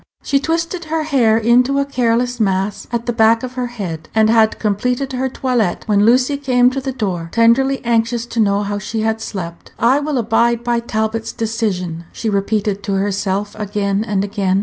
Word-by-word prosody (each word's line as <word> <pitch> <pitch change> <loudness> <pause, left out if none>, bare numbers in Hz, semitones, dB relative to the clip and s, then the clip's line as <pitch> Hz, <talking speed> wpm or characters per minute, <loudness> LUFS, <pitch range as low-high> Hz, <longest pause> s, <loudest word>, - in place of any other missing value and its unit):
She 275 - +1
twisted 330 +3 -2
her 315 0 -1
hair 250 -8 +3
into 245 +4 +3
a 280 - +1
careless 245 -2 0
mass 195 -1 -1
at 235 -1 -2
the 240 - -1
back 225 0 +3
of 255 0 -5
her 250 -1 -2
head, 190 -10 -6
and 220 0 +4
had 225 -1 +3
completed 250 +6 -1
her 260 +1 -1
toilet 245 -8 -1
when 205 -1 +3
Lucy 255 +4 +3
came 250 -3 +3
to 270 +1 -3
the 265 0 -3
door, 185 -9 -3
tenderly 255 +4 +3
anxious 230 0 +1
to 240 -1 -5
know 200 -1 +2
how 205 0 -3
she 220 +1 -3
had 220 0 -1
slept. 170 -6 -7
"I 250 +5 +3
will 295 -1 -2
abide 235 +1 +1
by 240 -1 +1
Talbot's 225 -1 -2
decision," 190 -7 -3
she 220 - -3
repeated 205 0 -1
to 200 0 -3
herself 200 +1 -1
again 205 -1 -1
and 205 -3 -1
again. 200 -2 0
225 Hz, 190 wpm, -18 LUFS, 205-250 Hz, -, and